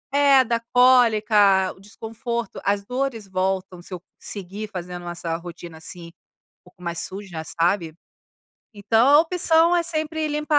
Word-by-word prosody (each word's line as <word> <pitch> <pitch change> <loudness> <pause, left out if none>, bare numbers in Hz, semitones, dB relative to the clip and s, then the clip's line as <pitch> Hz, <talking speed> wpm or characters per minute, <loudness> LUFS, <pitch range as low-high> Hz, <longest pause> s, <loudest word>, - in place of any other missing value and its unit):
É, 280 -2 +6
dá 235 -1 -1
cólica, 215 -6 +4
o - - -21
desconforto 225 +2 -6
as 200 0 0
dores 250 -3 -3
voltam, 185 -1 -2
se 180 - -15
eu - - -8 0.2
seguir 200 +2 -6
fazendo 180 -2 -7
essa 170 -1 -4
rotina, 170 -1 -10
assim, 170 +1 -8
um 170 - -29 0.3
pouco 180 0 -20
mais 170 -1 -4
suja, 190 -4 -6
sabe. 170 0 0 0.8
Então, 220 +3 +2
a 290 - +7
opção 335 0 +3
é 345 - +2
sempre 315 -1 -2
limpar 300 0 0
205 Hz, 145 wpm, -23 LUFS, 180-255 Hz, 0.8 s, a